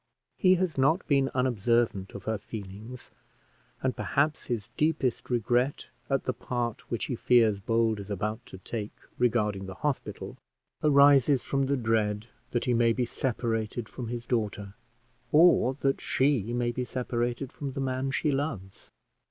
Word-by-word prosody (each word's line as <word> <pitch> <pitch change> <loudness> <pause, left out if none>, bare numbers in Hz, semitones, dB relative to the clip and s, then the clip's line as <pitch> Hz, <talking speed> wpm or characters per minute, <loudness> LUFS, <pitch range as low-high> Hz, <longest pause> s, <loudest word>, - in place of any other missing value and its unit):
He 185 -2 +6
has 175 -6 -1
not 160 +7 +2
been 135 -3 +3
unobservant 115 -5 +1
of 100 - -7
her 110 -1 -2
feelings, 110 +4 -9 0.7
and 130 -1 0
perhaps 150 +2 0
his 110 -4 -3
deepest 150 -5 0
regret 125 +3 0 0.2
at 135 -1 +1
the 130 - -1
part 120 -3 -4
which 115 - -2
he 125 - -3
fears 115 -4 +3
Bold 115 +1 +1
is 100 0 -8
about 105 +4 -3
to 95 - -10
take 105 +2 -6 0.2
regarding 105 -5 +1
the 95 - -7
hospital 120 -5 -3 0.4
arises 140 -3 +5
from 135 -1 0
the 140 0 +1
dread 110 -3 0 0.2
that 120 - -1
he 125 - +2
may 115 -1 +3
be 125 +1 0
separated 115 -2 -2
from 125 0 -7
his 120 0 -5
daughter, 105 -4 -2 0.6
or 150 -5 +5
that 135 0 +1
she 130 -5 +1
may 120 0 0
be 125 +1 -3
separated 120 +1 -2
from 140 -2 -5
the 135 - -4
man 130 0 -1
she 135 +3 0
loves. 135 -10 -4
120 Hz, 155 wpm, -28 LUFS, 110-135 Hz, 0.7 s, He